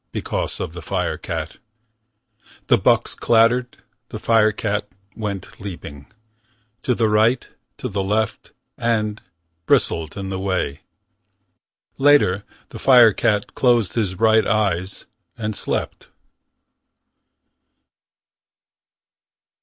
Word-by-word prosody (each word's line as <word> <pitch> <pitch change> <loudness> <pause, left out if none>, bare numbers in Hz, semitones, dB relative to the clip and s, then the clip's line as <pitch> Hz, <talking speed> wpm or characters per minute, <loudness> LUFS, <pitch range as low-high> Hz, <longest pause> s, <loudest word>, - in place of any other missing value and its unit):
Because - - -3
of 80 - -4
the 85 - -8
firecat. 80 - -3 1.1
The - - +5
bucks - - +2
clattered. 120 +2 +2 0.3
The - - -6
firecat 105 -2 +1 0.3
went 105 -3 -6
leaping. 80 -8 -8 0.7
To 125 - 0
the 115 -1 +2
right, 110 +4 +2 0.3
to - - -4
the 100 0 -2
left. 105 +2 -2 0.3
And 110 -2 -1 0.5
Bristled 80 +1 +1
in 95 -1 -4
the 95 -1 -3
way. 95 -7 -2 1.2
Later, 135 -9 +4 0.3
the - - -9
firecat 115 -5 +4
closed 120 -6 +2
his 100 -6 -1
bright 110 +2 +3
eyes 100 -3 -1 0.3
And 110 -2 -3
slept. - - -4
105 Hz, 95 wpm, -21 LUFS, 95-115 Hz, 1.2 s, The